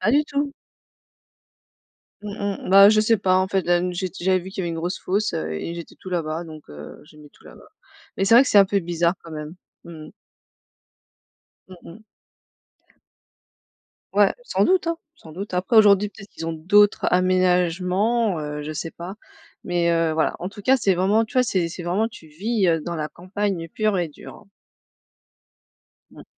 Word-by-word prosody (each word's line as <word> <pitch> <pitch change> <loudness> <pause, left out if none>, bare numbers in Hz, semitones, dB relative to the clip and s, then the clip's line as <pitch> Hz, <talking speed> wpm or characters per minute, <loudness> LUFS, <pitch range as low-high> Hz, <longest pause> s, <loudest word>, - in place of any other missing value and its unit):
Pas 210 +5 +2
du 295 +2 +4
tout. 285 -1 -2 1.7
Mmh 210 - -7 0.4
mh, - - -4
bah, 195 +1 +8
je 215 0 +4
sais 225 +1 +3
pas, 185 -1 +2
en 185 - +1
fait, 195 -1 0
là 175 0 +3
m 180 +1 -2
j'ai 185 +2 -2
j'avais 185 +1 +2
vu 185 +2 -9
qu'il 190 - -8
y - - -3
avait 170 - -2
une 165 - -4
grosse 175 +3 -3
fosse, 205 +3 -1
heu 80 0 -3
et 165 - -5
j'étais 170 -1 -9
tout 185 - -9
là-bas 165 -1 -3
donc 155 -2 -11
heu, 75 0 -11
j'ai 150 0 -19
mis 150 -1 -15
tout - - -25
là-bas. - - -15 0.5
Mais 195 - -1
c'est 195 - +3
vrai 245 - +8
que - - -5
c'est - - +4
un 200 - +8
peu 200 +1 0
bizarre, 170 0 0
quand 165 - -12
même. 155 +1 -7 0.3
Mmh 170 - -11 0.2
mh. - - -12 1.6
Mmh 185 - -12 0.2
mh. 220 +3 -17 2.1
Ouais, - - +4
sans - - 0
doute, 370 -2 +2
hein, 335 - -1 0.2
sans 160 - -15
doute. 195 +3 -7
Après, 180 +6 -1
aujourd'hui, 205 -1 +6
peut-être 200 0 -14
qu'ils 165 - -8
ont 165 - -2
d'autres 205 +6 +3
aménagements, 185 +3 +1
heu, 150 0 -5
je 155 - -5
sais 160 +2 -5
pas, 175 +3 -8 0.5
mais 175 -1 +1
heu, 165 -1 +1
voilà, 160 0 0
en 180 - -4
tout 200 +1 -10
cas, 265 +5 +3
c'est 195 -6 +1
vraiment 200 +5 +2
tu - - -16
vois, 255 - +4
c'est 185 -8 0
c'est 175 +1 -8
vraiment 190 +6 0
tu 230 -8 -14
vis, 195 +6 -1
heu, 165 -1 +2
dans 170 +2 -5
la 155 -1 -4
campagne 185 0 -4
pure 215 +3 -1
et 175 -2 -1
dure, 150 - -13
hein. - - -17 1.7
Mmh. - - -14
185 Hz, 200 wpm, -22 LUFS, 165-205 Hz, 2.1 s, bah